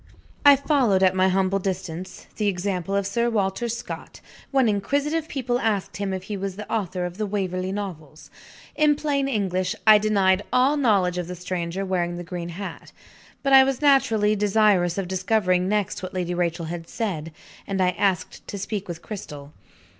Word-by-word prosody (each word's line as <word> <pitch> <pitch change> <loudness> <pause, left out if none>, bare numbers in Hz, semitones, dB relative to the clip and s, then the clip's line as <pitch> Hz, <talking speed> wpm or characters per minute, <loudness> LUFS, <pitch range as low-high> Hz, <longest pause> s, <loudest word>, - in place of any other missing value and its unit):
I 285 -1 +9
followed, 260 -9 +2
at 185 -1 +5
my 185 0 +3
humble 190 +1 +1
distance, 185 -2 -5
the 210 - 0
example 190 -1 -1
of 200 -1 +1
Sir 235 +4 0
Walter 210 +1 -1
Scott, 235 +1 -6 0.3
when 265 -3 +3
inquisitive 285 +10 0
people 245 -4 -1
asked 210 -5 -1
him 200 -1 -2
if 190 -1 -4
he 205 +1 -5
was 195 -1 -4
the 210 +1 -8
author 185 -4 -1
of 180 +3 -7
the 215 - -1
Waverley 185 -2 -2
Novels. 165 -7 -7 0.4
In 300 -1 +4
plain 285 -2 0
English, 185 -7 -1
I 215 -1 +8
denied 200 -3 +2
all 260 +4 +3
knowledge 195 -10 +2
of 175 - -4
the 180 - -6
stranger 180 +1 -3
wearing 175 -2 -1
the 175 - -5
green 170 0 -6
hat. 190 +4 -7 0.5
But, 275 -1 +2
I 265 0 +10
was 270 -1 -1
naturally 225 -8 +3
desirous 200 -4 +3
of 195 -2 -2
discovering 185 -1 +1
next 210 -2 -1
what 185 0 -7
Lady 180 -1 -1
Rachel 170 -1 -1
had 165 0 -6
said; 165 -9 -3 0.4
and 195 -1 -2
I 180 -1 +3
asked 185 0 -1
to 200 - -5
speak 200 0 -4
with 170 -2 -7
Cristel. 150 -8 -8
195 Hz, 180 wpm, -24 LUFS, 180-220 Hz, 0.5 s, I